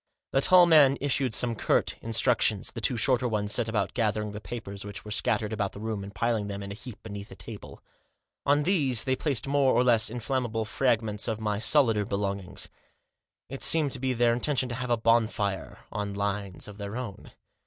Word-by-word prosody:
The 135 - +2
tall 180 +3 +7
man 150 -5 +6
issued 135 -2 0
some 120 +1 +1
curt 110 - 0
instructions. 115 -2 +1
The 115 - -7
two 120 +3 +3
shorter 125 +2 +3
ones 105 -3 -2
set 110 - +1
about 105 -3 -1
gathering 105 -2 -1
the 105 +1 -8
papers 100 -2 -7
which 105 +1 -8
were 105 - -8
scattered 110 0 0
about 100 -3 -2
the - - -9
room, 110 -2 -4
and 100 - -8
piling 115 -1 -1
them 100 -1 -5
in 100 - -7
a - - -4
heap 120 +2 -10
beneath 100 -2 -8
the 95 - -11
table. 100 +4 -11 0.6
On 145 +1 +2
these 145 - +2
they 130 -1 0
placed 140 -3 -1
more 140 -1 +2
or 125 - +4
less 115 -3 +4
inflammable 120 -1 -2
fragments 110 -3 0
of 110 -1 -2
my 105 -2 -2
solider 115 -3 +3
belongings. 100 -1 -3 0.8
It 135 - -8
seemed 155 -4 +5
to 130 - -3
be 130 0 -1
their 120 -1 +3
intention 130 +1 0
to 120 - -4
have 125 0 -4
a 120 - +2
bonfire 110 -3 0
on 100 -1 -4
lines 100 -2 -3
of 105 0 -11
their 100 +2 -5
own. 120 -6 -8
115 Hz, 200 wpm, -27 LUFS, 105-125 Hz, 0.8 s, tall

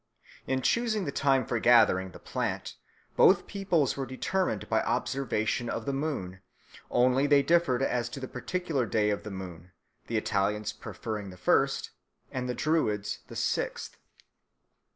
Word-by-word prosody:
In 130 -1 0
choosing 225 -4 +1
the 140 - -2
time 135 -2 +2
for 120 - -1
gathering 110 -6 +5
the 90 - -12
plant, - - -3 0.4
both - - +5
peoples 185 -9 0
were 135 -1 -4
determined 185 +8 -1
by - - +2
observation 120 -3 -1
of 115 - -3
the 140 - -1
moon; 135 -11 -3 0.5
only 130 +3 +3
they 140 -1 +5
differed 140 -5 +2
as 125 -3 0
to - - -7
the 130 - -5
particular 145 -1 -2
day 105 0 +2
of 100 - -2
the - - -7
moon, 90 -3 -8 0.3
the - - -1
Italians 105 +2 0
preferring 110 -5 -6
the 90 - -11
first, 90 - +1 0.4
and 125 -1 -3
the 125 - -2
Druids 110 -10 0
the - - -10
sixth. - - -2
125 Hz, 150 wpm, -29 LUFS, 105-145 Hz, 0.5 s, gathering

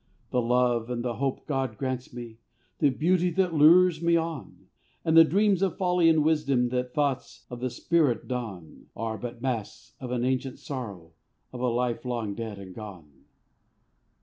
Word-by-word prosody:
The 125 - +2
love 120 -1 +1
and 120 0 -3
the 120 -2 -2
hope 135 0 -2
God 135 -6 -2
grants 130 -2 -3
me, 120 -2 -9 0.4
The 145 - +4
beauty 175 +6 +2
that 185 -1 +1
lures 165 +2 +6
me 170 0 +3
on, 165 -3 -5 0.4
And 160 - +2
the 165 - +10
dreams 195 +3 +2
of 195 -2 0
folly 180 -3 +3
and 160 -2 +4
wisdom 140 -6 +2
That 125 0 -3
thoughts 145 -3 -2
of 120 - -6
the 130 +1 -2
spirit 145 -3 +1
don, 110 -10 -6
Are 110 -1 -4
but 120 0 -7
masks 120 -6 -4
of 130 - -6
an 125 0 -1
ancient 130 0 -1
sorrow 100 - -7 0.4
Of 125 - -6
a 125 - +1
life 120 0 -1
long 120 -5 -3
dead 110 -1 -6
and 95 -2 -10
gone. 90 -8 -10
125 Hz, 175 wpm, -27 LUFS, 120-155 Hz, 0.4 s, the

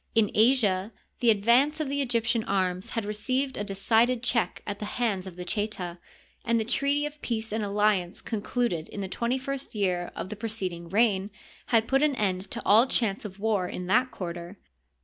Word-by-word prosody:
In 220 -3 +3
Asia 215 -4 +3 0.3
the 240 - +3
advance 240 +9 +4
of 310 - -1
the 280 +1 -1
Egyptian 230 -3 +1
arms 185 -1 -1
had 225 -2 -2
received 255 +6 -1
a 205 - -2
decided 225 +5 +2
check 240 -2 0
at 205 -1 -4
the 210 - -4
hands 205 -6 0
of 180 - -9
the 180 0 -7
Cheta, 185 -3 -2 0.4
and 230 0 +2
the - - +1
treaty 280 +5 +1
of 295 0 -7
peace 225 -2 -3
and 220 0 -1
alliance 200 -3 +1
concluded 220 -6 -2
in 200 - -6
the 195 - -3
twenty 235 +6 -1
first 275 -1 -5
year 180 -4 0
of 170 +3 -5
the 215 - -5
preceding 190 -6 -4
reign 200 -1 +2 0.4
had 225 -1 +3
put 270 +1 +3
an 300 -2 +3
end 190 -3 -1
to 235 - -6
all 225 +5 +6
chance 220 -5 0
of 195 -2 -7
war 205 -4 +1
in 180 - -5
that 250 +8 +3
quarter. 175 0 -6
215 Hz, 190 wpm, -27 LUFS, 190-240 Hz, 0.4 s, all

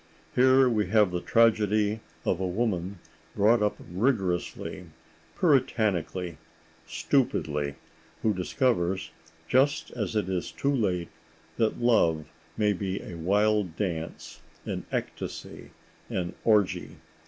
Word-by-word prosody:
Here 130 +1 +5
we 110 -5 +1
have 105 -1 +4
the 90 0 -2
tragedy 110 -2 +3 0.3
of 90 - +1
a 95 - -1
woman 95 -2 -1 0.4
brought 110 +2 +4
up 105 0 +1
rigorously, 95 -2 -1 0.5
puritanically, 100 - +1 0.5
stupidly, 75 -2 0 0.5
who 110 - +3
discovers, 95 - 0 0.4
just 135 - +2
as 110 -3 -3
it 105 -3 +1
is 95 -2 -2
too 140 +1 0
late, 90 -9 0 0.5
that 110 -1 +1
love 85 -10 +3 0.3
may 105 -1 +3
be 95 0 -3
a - - -8
wild 100 +1 +1
dance, 85 -5 -4 0.2
an - - -4
ecstasy, - - -5 0.4
an 90 -2 -2
orgy. 105 -4 +2
105 Hz, 110 wpm, -27 LUFS, 90-115 Hz, 0.5 s, Here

